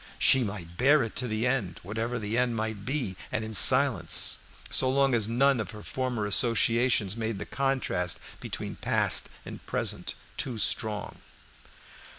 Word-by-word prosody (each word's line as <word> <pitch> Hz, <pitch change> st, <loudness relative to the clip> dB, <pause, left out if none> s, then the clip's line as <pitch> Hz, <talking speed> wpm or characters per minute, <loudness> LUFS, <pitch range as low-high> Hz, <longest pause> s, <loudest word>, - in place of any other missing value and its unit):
She 135 Hz, -1 st, +4 dB
might 90 Hz, -5 st, -7 dB
bear 140 Hz, +3 st, +4 dB
it 115 Hz, -, -7 dB
to 125 Hz, -, -1 dB
the 110 Hz, +1 st, -2 dB
end, 125 Hz, -8 st, -2 dB
whatever 115 Hz, +6 st, -4 dB
the 110 Hz, -1 st, -4 dB
end 125 Hz, -1 st, 0 dB
might 110 Hz, -2 st, -4 dB
be, 130 Hz, -9 st, -3 dB, 0.2 s
and 110 Hz, 0 st, -2 dB
in 110 Hz, -, -7 dB
silence, 125 Hz, -, +5 dB, 0.3 s
so 130 Hz, -, +2 dB
long 135 Hz, 0 st, +2 dB
as 110 Hz, -2 st, +1 dB
none 135 Hz, +2 st, +2 dB
of 110 Hz, -, -4 dB
her 105 Hz, -2 st, -10 dB
former 125 Hz, -5 st, -3 dB
associations 115 Hz, 0 st, +2 dB
made 110 Hz, -2 st, -3 dB
the -, -, -6 dB
contrast 130 Hz, -, -2 dB, 0.2 s
between -, -, -6 dB
past -, -, +3 dB, 0.2 s
and -, -, -10 dB
present -, -, -3 dB, 0.2 s
too 125 Hz, -4 st, -3 dB
strong. 105 Hz, -1 st, 0 dB
115 Hz, 160 wpm, -27 LUFS, 105-130 Hz, 0.3 s, silence